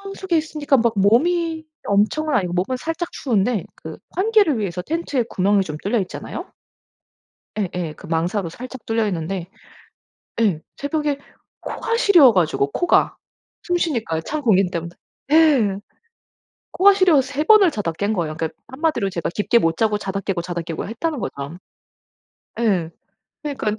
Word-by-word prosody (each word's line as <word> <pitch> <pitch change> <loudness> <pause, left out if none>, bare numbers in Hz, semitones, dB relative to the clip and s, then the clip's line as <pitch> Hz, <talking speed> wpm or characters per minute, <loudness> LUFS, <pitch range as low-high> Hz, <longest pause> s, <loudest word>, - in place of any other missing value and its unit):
속에 370 -4 0
있으니까 305 -2 +1
막 230 -1 +2
몸이 320 - +2 0.2
엄청은 220 +10 +1
아니고 180 -6 0
몸은 190 +9 -1
살짝 325 +5 -4
추운데 225 - 0
그 - - -9 0.2
환기를 395 - +3
위해서 180 -3 -3
텐트에 295 - -1
구멍이 195 +1 +2
좀 150 -4 -6
뚫려 215 +3 +1
있잖아요. 185 - -7 1.1
예 195 -4 0
예. 170 -4 -3
그 - - -13
망사로 170 +3 -1
살짝 255 +5 -9
뚫려있는데 195 -5 -2 0.9
예. 180 -8 +2 0.2
새벽에 290 0 -1 0.4
코가 460 0 -2
시려워 345 - +7
가지고 155 -6 +1
코가 350 - +2 0.5
숨 355 -1 0
쉬니까 230 - -1
찬 305 - -4
공기 195 -7 +3
때문 170 -1 -4 0.4
예. 290 -11 +5 1.0
코가 395 +1 +6
시려워서 310 -9 +3
3 290 +2 -1
번을 415 -2 +6
자다 205 - -2
깬 200 +6 -1
거예요. 165 -6 -2
그러니까 160 -1 -4
한마디로 260 - -1
제가 170 -2 -3
깊게 215 +3 +3
못 165 -6 +1
자고 210 0 +1
자다 195 -1 -3
깨고 195 -2 -2
자다 175 -1 -4
깨고 165 -1 -5
했다는 285 +7 -3
거죠. 140 -3 -5 1.0
예. 190 -8 +1 0.5
그러니깐 220 -8 -2
225 Hz, 320 characters per minute, -21 LUFS, -, 1.1 s, 시려워